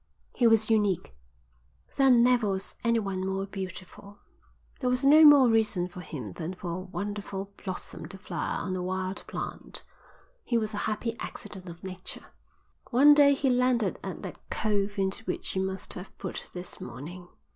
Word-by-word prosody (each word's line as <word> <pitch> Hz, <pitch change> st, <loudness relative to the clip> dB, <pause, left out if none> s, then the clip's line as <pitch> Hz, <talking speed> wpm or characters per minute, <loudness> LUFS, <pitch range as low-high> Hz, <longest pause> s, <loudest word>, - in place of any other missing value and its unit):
"He 240 Hz, -, +4 dB
was 225 Hz, -1 st, +4 dB
unique. 200 Hz, -, +1 dB, 0.8 s
There 270 Hz, -1 st, +5 dB
never 245 Hz, -3 st, +5 dB
was 190 Hz, 0 st, -2 dB
anyone 205 Hz, -5 st, 0 dB
more 190 Hz, +1 st, -1 dB
beautiful. 195 Hz, +1 st, -8 dB, 0.6 s
There 250 Hz, -, 0 dB
was 250 Hz, +2 st, +1 dB
no 305 Hz, +3 st, +8 dB
more 290 Hz, -4 st, +9 dB
reason 220 Hz, -6 st, +2 dB
for 180 Hz, 0 st, -9 dB
him 125 Hz, -, -7 dB
than 165 Hz, -, -5 dB
for 180 Hz, -1 st, -5 dB
a 170 Hz, -, -3 dB
wonderful 200 Hz, +1 st, -5 dB
blossom 185 Hz, -2 st, -6 dB
to 195 Hz, -, -9 dB
flower 185 Hz, -3 st, -3 dB
on 185 Hz, -1 st, -2 dB
a 185 Hz, -, -2 dB
wild 185 Hz, +1 st, -3 dB
plant. -, -, -5 dB, 0.6 s
He 235 Hz, -, +1 dB
was 215 Hz, -1 st, -1 dB
a -, -, -3 dB
happy 225 Hz, +2 st, -2 dB
accident 185 Hz, -2 st, -8 dB
of 170 Hz, 0 st, -11 dB
nature." 185 Hz, -1 st, -7 dB, 0.6 s
"One 275 Hz, +4 st, +7 dB
day 285 Hz, -1 st, +6 dB
he 270 Hz, -1 st, +1 dB
landed 250 Hz, -4 st, +2 dB
at -, -, -6 dB
that -, -, -7 dB
cove 205 Hz, -1 st, 0 dB
into 195 Hz, +3 st, 0 dB
which -, -, -3 dB
you 190 Hz, -, +1 dB
must 190 Hz, 0 st, -4 dB
have 180 Hz, +2 st, -9 dB
put 190 Hz, -, -5 dB
this 180 Hz, 0 st, -6 dB
morning. 160 Hz, +9 st, -8 dB
200 Hz, 165 wpm, -28 LUFS, 185-230 Hz, 0.8 s, more